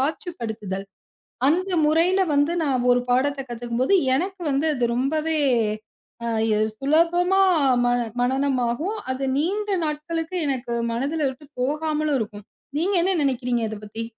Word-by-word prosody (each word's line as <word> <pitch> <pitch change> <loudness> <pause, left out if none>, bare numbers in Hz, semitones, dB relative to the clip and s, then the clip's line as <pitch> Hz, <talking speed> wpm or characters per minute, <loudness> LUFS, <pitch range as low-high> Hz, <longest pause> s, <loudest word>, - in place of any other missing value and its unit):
காட்சிப்படுத்துதல், 220 - -3 0.6
அந்த 365 +5 +1 0.2
முறையில 340 +5 +3
வந்து 290 +4 +2
நான் 255 -4 0
ஒரு 245 - +1
பாடத்த 275 +2 +1
கத்துக்கும்போது, 240 +6 -1 0.2
எனக்கு 370 +4 -3
வந்து 280 +4 +1
அது 245 -2 +1
ரொம்பவே 310 +5 0 0.9
அ - - -2 0.5
சுலபமா 345 +6 +3 0.4
மன 245 0 +2 0.2
மனனமாகும், 265 - 0
அது 265 +1 -3
நீண்ட 410 +7 -1 0.2
நாட்களுக்கு 325 +3 -3
எனக்கு 255 -3 -2 0.2
மனதுல 285 +6 -1
இருந்து 265 +3 -7 0.2
போகாமலும் 305 +1 0
இருக்கும். 210 -2 -6 0.3
நீங்க 370 +6 +1
என்ன 375 +3 +2
நெனைக்கிறீங்க 250 -3 0
இதப்பத்தி? 215 +1 -6
280 Hz, 120 wpm, -23 LUFS, 245-325 Hz, 0.9 s, முறையில